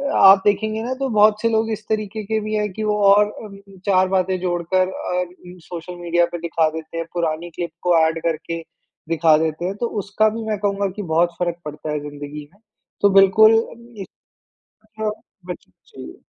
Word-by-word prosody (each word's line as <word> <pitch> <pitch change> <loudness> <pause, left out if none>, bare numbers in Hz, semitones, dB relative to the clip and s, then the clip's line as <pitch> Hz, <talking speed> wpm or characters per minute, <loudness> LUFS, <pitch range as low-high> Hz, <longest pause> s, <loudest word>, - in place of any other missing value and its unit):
आप 195 0 +8
देखेंगे 215 +1 +1
ना 250 +2 -2
तो 270 - 0
बहुत 215 -1 +4
से 230 - +2
लोग 225 0 0
इस 215 0 -4
तरीके 215 0 -2
के 220 +2 -1
भी 215 +1 -4
है 210 0 0
कि 215 +3 -6
वो 210 -1 0
और 205 +1 +5 0.2
अम, 200 -2 -11 0.3
4 185 -1 +3
बातें 185 0 +1
जोड़कर 180 +1 0
अर 180 -1 -4 0.3
सोशल 175 +1 -8
मीडिया 175 0 +2
पे 175 - -4
दिखा 165 -1 +1
देते 160 +1 -8
हैं 165 - -2
पुरानी 170 0 -2
क्लिप 175 -1 -4
को 175 -1 +3
ऐड 160 +1 +1
करके 165 0 -2 0.5
दिखा 160 -2 +4
देते 160 +1 -2
हैं। 190 +2 -2
तो 235 - +1 0.2
उसका 210 +2 +2
भी 225 +1 -5
मैं 215 - 0
कहूँगा 200 -1 0
कि 205 - -3
बहुत 170 +1 +3
फ़र्क़ 175 -1 -1
पड़ता 150 +1 -6
है 150 - -1
ज़िन्दगी 145 0 -8
में। 200 - -26 0.4
तो 205 - +5
बिल्कुल 215 +3 +6 0.2
इससे 235 -3 -11 0.8
अच्छा 215 0 -3 0.4
बचना 175 - -9
चाहिए। 65 0 -11
185 Hz, 190 wpm, -21 LUFS, 165-215 Hz, 0.8 s, आप